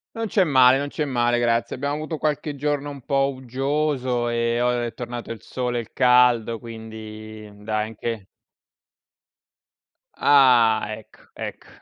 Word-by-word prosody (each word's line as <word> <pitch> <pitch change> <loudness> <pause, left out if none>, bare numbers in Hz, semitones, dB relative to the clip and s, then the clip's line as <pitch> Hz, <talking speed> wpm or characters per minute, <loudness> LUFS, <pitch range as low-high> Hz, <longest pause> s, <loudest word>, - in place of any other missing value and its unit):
Non 225 - -2
c'è 195 -2 +3
male, 130 -2 +5
non 145 - -2
c'è 150 +1 -3
male, 120 -2 +1
grazie. 115 -1 0
Abbiamo 140 +2 -2
avuto 155 +1 -4
qualche 150 -1 -2
giorno 145 0 -2
un 140 -2 -9
po' 135 -1 +2
uggioso, 130 -1 -1
ehm, 115 0 0
o 125 - +3
è 120 -1 -4
tornato 120 -1 -6
il 115 - -7
sole 125 -1 -3
e - - 0
il 115 - -15
caldo. 125 -2 +4
Quindi, 110 -1 -9
dai 105 +1 -2
anche 115 -1 -5 1.9
Ah, 120 -6 +5
ecco, 110 - -17
ecco! - - -7
125 Hz, 145 wpm, -23 LUFS, 115-140 Hz, 1.9 s, male